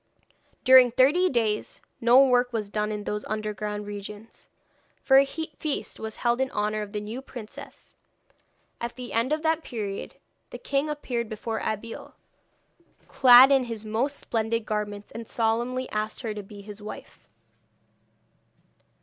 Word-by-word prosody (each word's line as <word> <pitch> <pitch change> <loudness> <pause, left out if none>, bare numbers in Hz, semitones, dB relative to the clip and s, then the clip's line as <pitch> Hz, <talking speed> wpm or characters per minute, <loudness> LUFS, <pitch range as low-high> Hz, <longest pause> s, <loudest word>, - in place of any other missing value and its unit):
During 260 -1 +8
thirty 290 +10 +4
days 220 -4 -1 0.2
no 245 +4 +6
work 250 -1 +2
was 215 -3 -3
done 210 0 -1
in 210 -1 -4
those 210 0 -3
underground 210 -1 -4
regions, 205 +2 -9 0.6
for 270 0 +6
a 275 - +4
feast 315 -1 -5
was 220 0 -6
held 240 +1 0
in 265 - 0
honour 210 -1 -1
of 205 -1 -6
the 210 - -3
new 215 +5 -6
princess. 240 -5 -11 0.8
At 235 0 -5
the 250 -1 -8
end 230 +5 +1
of 310 +1 0
that 320 0 +1
period, 205 -5 -5 0.3
the - - -8
king 280 +2 -1
appeared 245 -6 -3
before 220 +1 -4
Abeille, 220 +2 -5 0.9
clad 255 +1 +8
in 270 -2 +4
his 225 -2 -6
most 240 +7 -1
splendid 225 0 -2
garments, 210 -1 -4
and 230 0 -8
solemnly 240 +3 -1
asked 215 0 -3
her 225 -4 -3
to 210 - -6
be 205 +1 -12
his 205 0 -10
wife. 210 - -10
230 Hz, 150 wpm, -26 LUFS, 210-255 Hz, 0.9 s, During